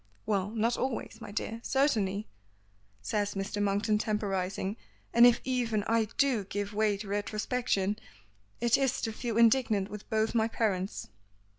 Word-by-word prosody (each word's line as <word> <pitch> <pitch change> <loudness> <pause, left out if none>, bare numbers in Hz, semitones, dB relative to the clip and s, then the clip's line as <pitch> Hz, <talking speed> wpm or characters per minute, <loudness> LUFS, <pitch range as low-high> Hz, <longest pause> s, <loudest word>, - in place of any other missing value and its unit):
"Well, 200 -2 0
not 230 +2 0
always, 250 -3 -3
my - - -7
dear, 225 +2 -3
certainly 215 -8 +1 0.4
" 100 0 -37
says 205 -1 0
Mr. 195 +1 -2
Monkton 205 +2 +1
temporizing. 195 -2 -1 0.4
"And 235 +1 +8
if 240 -1 +4
even 240 -5 0
I 225 +1 +2
do 265 -7 +3
give 205 +1 -4
way 210 -1 +2
to 205 +1 -7
retrospection, 210 0 -1 0.6
it 235 +1 +3
is 270 -2 +1
to 225 - -2
feel 230 -1 -3
indignant 225 -4 +3
with 210 0 -8
both 220 0 +1
my 225 -1 +3
parents." 200 -4 -1
215 Hz, 150 wpm, -30 LUFS, 200-230 Hz, 0.6 s, And